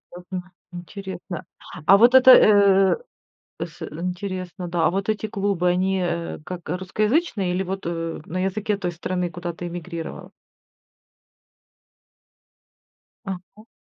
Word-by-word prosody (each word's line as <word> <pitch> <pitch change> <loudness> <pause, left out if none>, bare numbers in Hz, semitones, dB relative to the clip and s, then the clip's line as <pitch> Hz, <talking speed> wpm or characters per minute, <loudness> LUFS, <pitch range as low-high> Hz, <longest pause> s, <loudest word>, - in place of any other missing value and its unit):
Ага, 180 0 -7 0.2
интересно, 180 -1 -7 0.4
а 195 - +8
вот 240 +4 +6
это, 260 0 +9
э, 200 -4 +6 0.7
с - - -12
интересно, 180 +1 -5
да, 170 -1 +1
а - - +4
вот 195 +3 -2
эти 215 0 0
клубы, 195 -3 0
они, 190 +1 +1
э, 170 -1 -2
как 180 -2 -7
русскоязычные 205 - 0
или 190 - 0
вот, 190 -1 -5
э, 165 -1 -3
на 185 +3 -2
языке 205 +2 -1
той 180 -3 -3
страны, 180 +1 -2
куда 175 0 -5
ты 175 +1 -7
эмигрировала? 170 -1 -7 3.0
Ага. 195 +3 -8
185 Hz, 120 wpm, -23 LUFS, 175-200 Hz, 3.0 s, это